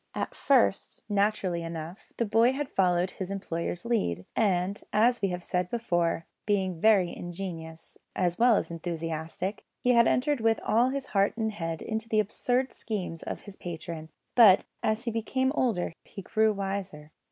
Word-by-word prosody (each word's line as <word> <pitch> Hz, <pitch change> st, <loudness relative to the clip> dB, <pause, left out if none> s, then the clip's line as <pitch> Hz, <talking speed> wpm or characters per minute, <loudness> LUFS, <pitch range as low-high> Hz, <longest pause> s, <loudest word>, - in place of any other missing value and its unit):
At -, -, -3 dB
first, 255 Hz, -7 st, +2 dB
naturally 200 Hz, -4 st, +1 dB
enough, 165 Hz, +2 st, -7 dB
the 235 Hz, -, +1 dB
boy 225 Hz, +4 st, +4 dB
had 280 Hz, 0 st, -4 dB
followed 180 Hz, -1 st, +2 dB
his 190 Hz, -1 st, -6 dB
employer's 175 Hz, -2 st, -4 dB
lead, 95 Hz, -, 0 dB
and, 195 Hz, -2 st, +1 dB
as 240 Hz, +2 st, +3 dB
we 200 Hz, -, +2 dB
have 180 Hz, -1 st, -4 dB
said 180 Hz, 0 st, -1 dB
before, 175 Hz, -8 st, 0 dB, 0.2 s
being 190 Hz, -5 st, 0 dB
very 200 Hz, -5 st, +4 dB
ingenious, 170 Hz, -3 st, -7 dB, 0.2 s
as 175 Hz, 0 st, 0 dB
well 240 Hz, -1 st, +6 dB
as -, -, -1 dB
enthusiastic, 165 Hz, +3 st, -4 dB, 0.2 s
had 235 Hz, -2 st, +5 dB
entered 290 Hz, +2 st, +2 dB
with 225 Hz, -1 st, +3 dB
all 235 Hz, +4 st, +3 dB
his 275 Hz, 0 st, -3 dB
heart 200 Hz, -2 st, +1 dB
and 220 Hz, -1 st, 0 dB
head 165 Hz, -5 st, -4 dB
into 220 Hz, 0 st, -4 dB
the 215 Hz, -, +3 dB
absurd 245 Hz, +5 st, 0 dB
schemes 185 Hz, -7 st, -4 dB
of -, -, -5 dB
his 200 Hz, -2 st, -11 dB
patron; 165 Hz, -2 st, -7 dB, 0.2 s
but 210 Hz, -6 st, +7 dB, 0.2 s
as 220 Hz, +1 st, 0 dB
he 235 Hz, -, -2 dB
became 260 Hz, +4 st, 0 dB
older 225 Hz, -, 0 dB
he 195 Hz, -, -10 dB
grew 220 Hz, +3 st, +2 dB
wiser. 195 Hz, -6 st, -4 dB
195 Hz, 165 wpm, -28 LUFS, 175-225 Hz, 0.2 s, but